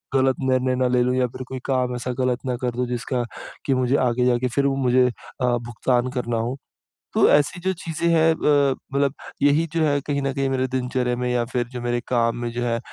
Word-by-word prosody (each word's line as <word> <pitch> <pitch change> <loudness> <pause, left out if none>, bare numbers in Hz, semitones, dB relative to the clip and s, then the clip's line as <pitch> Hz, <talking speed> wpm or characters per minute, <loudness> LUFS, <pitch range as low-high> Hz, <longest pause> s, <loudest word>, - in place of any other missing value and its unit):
गलत 130 -1 +3
निर्णय 130 0 +2
ना 130 0 +1
ले 125 0 +2
लूँ। 125 +1 +1
या 130 -1 +2
फिर 125 +2 -8
कोई 130 - -5
काम 125 -2 0
ऐसा 125 +1 -3
गलत 125 -1 +1
ना 125 -1 -1
कर 125 -1 0
दूँ, 125 0 -1
जिसका 125 +1 -2 0.4
कि 135 - +2
मुझे 130 +1 +1
आगे 125 +1 +1
जाके 125 0 +2
फ़िर 140 +3 0
वो 140 -1 +2
मुझे 125 0 +4
अ, - - -1 0.5
भुगतान 120 +1 -1
करना 120 -1 -2
हो। 120 +4 -2 0.6
तो - - +5
ऐसी 145 +4 +3
जो 190 +2 +1
चीज़ें 165 0 -2
हैं 165 -1 +4
अ, - - -9 0.5
मतलब 140 0 +2 0.3
यही 145 +3 +4
जो 165 - +1
है 145 -1 +2
कहीं 140 -1 0
न 135 0 -1
कहीं, 135 0 0
मेरे 130 -1 0
दिनचर्या 125 -1 -1
में 125 0 -1
या 125 -1 +1
फिर 120 -1 0
जो 125 - -5
मेरे 120 0 0
काम 115 -1 +1
में 120 - -2
जो 120 +1 -3
है, 115 -1 0
125 Hz, 230 wpm, -23 LUFS, 120-135 Hz, 0.6 s, तो